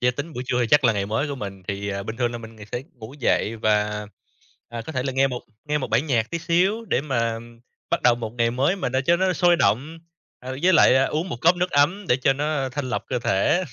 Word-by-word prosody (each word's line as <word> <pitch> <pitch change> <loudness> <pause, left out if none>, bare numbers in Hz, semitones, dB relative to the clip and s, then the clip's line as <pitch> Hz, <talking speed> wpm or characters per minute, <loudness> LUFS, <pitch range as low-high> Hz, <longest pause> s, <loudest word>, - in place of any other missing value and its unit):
yeah, 125 0 +1
tính 155 +3 -5
buổi 125 - -5
trưa 125 0 0
thì 120 - +2
chắc 145 -2 +5
là 115 - +5
ngày 100 -1 -2
mới 115 +8 -1
của 140 - -3
mình 100 -6 -7
thì, 100 0 -3
ờ, 100 0 -3
bình 110 +3 -6
thường 120 -1 0
là 120 - -5
mình 110 0 -11
ng 105 - -11
sẽ 120 - -3
ngủ 120 +2 -11
dậy 115 -3 +1
và, 105 -1 0 0.6
à, 115 0 -6
có 160 - -5
thể 130 - -1
là 135 0 -2
nghe 135 +1 +3
1, 125 -2 -4 0.2
nghe 150 0 0
1 130 - -5
bản 125 +8 +2
nhạc 115 -4 0
tí 170 - -2
xíu 185 +7 +1
để 180 - 0
mà 115 -5 -1 0.5
bắt - - 0
đầu 120 -1 +5
một 115 -2 -6
ngày 115 0 +3
mới 135 +10 +1
mà 185 - -2
nó 130 +1 0
cho 170 - +5
nó 185 +1 +1
sôi 175 -1 +3
động. 150 +5 0 0.4
À, 130 - -7
với 185 +1 +5
lại, 155 - +6
à, 135 - +4
uống 155 +6 -2
1 - - -4
cốc 170 +2 +4
nước 180 +1 0
ấm 170 +8 +2
để 125 - +4
cho 130 +1 +2
nó 145 -1 -1
thanh 130 0 -4
lọc - - -2
cơ 125 - -1
thể. 120 - +1
130 Hz, 275 wpm, -23 LUFS, 115-155 Hz, 0.6 s, lại